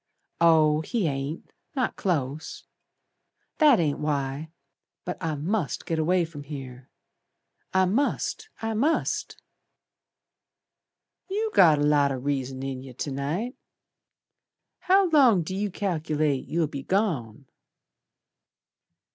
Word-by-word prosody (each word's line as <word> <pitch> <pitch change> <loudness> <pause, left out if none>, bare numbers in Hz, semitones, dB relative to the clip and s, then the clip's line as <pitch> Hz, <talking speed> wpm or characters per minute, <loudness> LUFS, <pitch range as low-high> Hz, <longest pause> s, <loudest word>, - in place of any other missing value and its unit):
"Oh, 155 -2 +5
he 220 +4 -1
ain't. 140 +2 -4 0.2
Not 255 -4 0
close. 155 -4 -2 1.0
That 295 -7 +6
ain't 150 -4 0
why. 145 0 -2 0.6
But 180 - -5
I 160 -2 -1
must 165 +3 -2
git 165 -1 -1
away 175 +2 +2
from 160 -3 -9
here. 135 -3 -9 0.8
I 190 0 +3
must! 285 - -1
I 225 0 -1
must!" 285 +9 0 1.9
"You 430 +3 -1
got 160 -5 +6
a 145 - 0
lot 145 -1 +3
o' 135 - -2
reason 135 -1 -3
in 135 -1 -4
yer 130 -1 -10
To 140 +3 -4
night. 160 - -3 1.2
How 385 +1 +4
long 250 - +5
d' 160 - -6
you 200 +2 -1
cal'late 155 -7 -1
You'll 165 0 +1
be 140 -2 -6
gone?" 140 - -1
155 Hz, 115 wpm, -26 LUFS, 140-200 Hz, 1.9 s, That